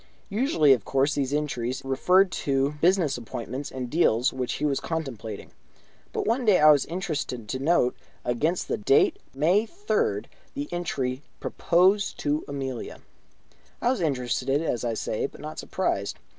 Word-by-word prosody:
Usually, 200 - +4
of 120 -6 -1
course, 135 +4 +1
these 135 -2 -1
entries 135 -3 -2
referred 180 +8 +3
to 135 -3 0
business 170 -7 +3
appointments 120 +4 -5
and 130 -1 -5
deals 125 -4 +2
which 130 -1 -2
he 150 - -2
was 140 -2 +1
contemplating, 130 -10 -5 0.6
but - - -2
one 235 +4 +1
day 210 -5 +5
I 155 0 +8
was 145 -3 +3
interested 155 - -3
to 130 +4 -3
note, 135 -3 +2 0.3
against 150 +9 0
the - - -1
date 405 -4 +3 0.2
May 180 +10 +3
3rd, 405 - -1 0.3
the 285 +1 -3
entry: 135 -7 -2 0.2
"Propose 185 +4 +2
to 145 +1 -1
Amelia" 135 -3 -5 0.8
I 245 - +2
was 260 - -2
interested, 135 -2 0
as 140 -7 -2
I 115 -2 -1
say, 110 - -2
but - - -16
not 155 +1 -7
surprised. 100 - -2
145 Hz, 155 wpm, -26 LUFS, 130-180 Hz, 0.8 s, I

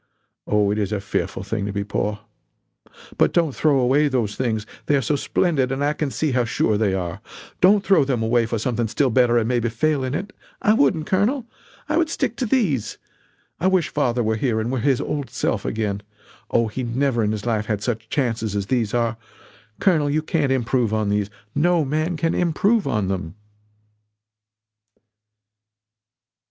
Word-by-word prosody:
Oh, 105 -1 +2
it 105 - -1
is 105 -1 -1
a 105 - -1
fearful 95 -1 -3
thing 100 0 -3
to - - -2
be 100 0 -2
poor. 105 +1 -2 1.0
But - - +3
don't 165 -5 +2
throw 150 0 +2
away 135 +4 +3
those 120 -7 -1
things 110 -4 -1 0.2
they 145 - +3
are 140 - +2
so 145 - +1
splendid 140 -2 0
and 135 +1 -1
I 145 - +1
can 150 -1 -2
see 155 +2 -1
how 125 -1 +2
sure 110 -1 +1
they 105 -2 +1
are. 90 +2 -4 0.4
Don't 200 +2 +5
throw 190 -7 +5
them 130 -4 -1
away 115 0 +2
for 115 - -2
something 115 +1 -1
still 130 +4 +1
better 120 0 +4
and 115 -1 +1
maybe 120 -1 +1
fail 140 +4 0
in 130 +2 -2
it! 200 +6 -5 0.3
I 210 - +3
wouldn't, 155 -4 +2
Colonel. 225 - +1 0.4
I 305 +1 0
would 330 -2 +2
stick 265 -7 -1
to 250 - -1
these. 165 - 0 0.6
I 185 - +2
wish 185 -3 +2
father 125 -5 0
were 110 0 0
here 115 -2 0
and 115 +3 -2
were 130 - -1
his 135 +1 +2
old 145 -3 -3
self - - -2
again 105 -2 -2 0.5
Oh, 115 -1 +2
he 110 +4 -4
never 120 0 0
in 105 - +1
his 105 -2 -4
life 110 -3 0
had 105 -2 -2
such 115 -1 -3
chances 115 -6 -1
as 100 -1 -1
these 115 -1 0
are. 115 -1 0 0.6
Colonel; 160 -7 +2
you 155 +2 0
can't 155 -4 0
improve 120 -3 +1
on 110 -2 0
these 105 0 0 0.2
no 170 +1 +2
man 155 +5 -1
can 165 +2 0
improve 195 +4 +1
on 105 -7 0
them!" 95 -3 -3
125 Hz, 190 wpm, -22 LUFS, 110-150 Hz, 1.0 s, Don't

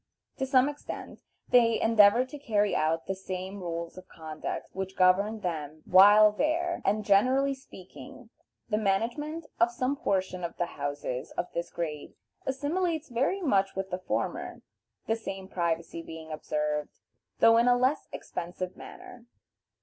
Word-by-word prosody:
To 265 - -2
some 260 0 +4
extent, 290 0 -7 0.3
they 230 -2 +5
endeavor 225 +2 +5
to 290 +3 -10
carry 210 -6 +1
out 160 +1 0
the 190 - -2
same 190 +1 -6
rules 170 0 -5
of 185 - -16
conduct 155 -1 -6
which 190 0 -5
governed 200 +4 +3
them 155 -3 -4
while 205 +3 +8
there, 330 +9 0
and, 210 0 0
generally 255 +8 +3
speaking, 190 - -13 0.4
the 210 -2 0
management 240 +11 -1
of 230 +1 +5
some 255 +3 -1
portion 185 -7 -1
of 170 - -5
the 175 - 0
houses 145 -3 -4
of 175 - -3
this 170 - -3
grade 155 -3 -5 0.3
assimilates 315 +4 -1
very 270 +11 0
much 195 - +2
with 190 0 -4
the 180 - -2
former, 185 - -3 0.4
the 225 - +1
same 195 -4 -7
privacy 170 -2 -2
being 160 -1 -9
observed, 150 -1 -2 0.4
though 230 0 +6
in 235 +1 +4
a 245 0 +5
less 255 +4 +1
expensive 180 +1 -5
manner. 240 -1 -12
200 Hz, 150 wpm, -28 LUFS, 170-245 Hz, 0.4 s, while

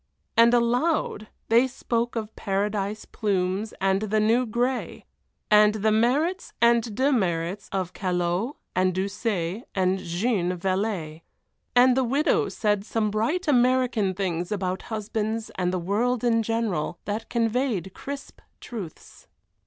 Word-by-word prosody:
And 230 0 +6
aloud 245 0 +1 0.2
they 235 +3 +5
spoke 240 -2 -2
of 220 -1 -4
paradise 205 +1 -2
plumes 195 +1 -1
and 195 +1 +2
the 215 0 +1
new 230 +4 +3
gray, 245 +3 -2 0.5
and 210 0 +6
the 215 +1 +1
merits 280 - +1
and 235 -2 +3
demerits 200 - 0
of 185 -2 -2
Callot 180 - -1 0.2
and 185 0 +2
Doucet 195 0 -2
and 190 0 +1
Jeanne 180 0 -1
Valez. 185 -4 -2 0.5
And 250 0 +6
the 265 - +2
widow 275 +6 +2
said 210 -2 0
some 215 -1 -1
bright 300 - 0
American 250 -7 +2
things 180 -2 -2
about 185 -2 -2
husbands 220 0 -3
and 180 -1 -1
the 185 - -1
world 215 +7 0
in 230 -2 +3
general 220 -8 -1
that 215 +2 -4
conveyed 230 - 0
crisp 280 0 -8 0.2
truths. 200 -10 -9
215 Hz, 130 wpm, -25 LUFS, 190-235 Hz, 0.5 s, And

